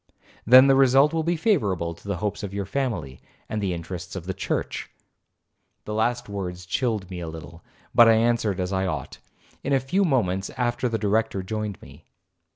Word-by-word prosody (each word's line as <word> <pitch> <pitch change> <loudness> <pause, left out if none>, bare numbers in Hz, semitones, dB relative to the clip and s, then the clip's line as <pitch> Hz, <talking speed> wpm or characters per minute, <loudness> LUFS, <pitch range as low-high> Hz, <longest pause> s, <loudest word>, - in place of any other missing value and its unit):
'—'Then 130 +3 +9
the 135 - +5
result 135 +3 +5
will 165 - +1
be 170 +2 0
favourable 100 - +1
to 85 - -16
the 100 -3 -2
hopes 105 +3 -3
of 100 -1 -6
your 100 -1 -2
family, 95 - -3 0.3
and 110 - -3
the 95 -2 -1
interests 90 +2 -6
of 90 -3 -6
the 95 - -3
church.' - - -3 1.0
The 105 - -4
last 120 +3 0
words 90 -3 -5
chilled 105 +1 -1
me 90 - -5
a 85 - -5
little, 80 +1 -10 0.3
but 120 - +7
I - - +7
answered 110 -4 +1
as 90 +1 -2
I 95 0 0
ought. 75 -6 -5 0.4
In 140 - 0
a 135 - +4
few 160 +10 0
moments 100 - 0
after 120 0 0
the 115 - -1
Director 105 -1 0
joined 105 0 -4
me. - - -15
105 Hz, 190 wpm, -24 LUFS, 90-125 Hz, 1.0 s, Then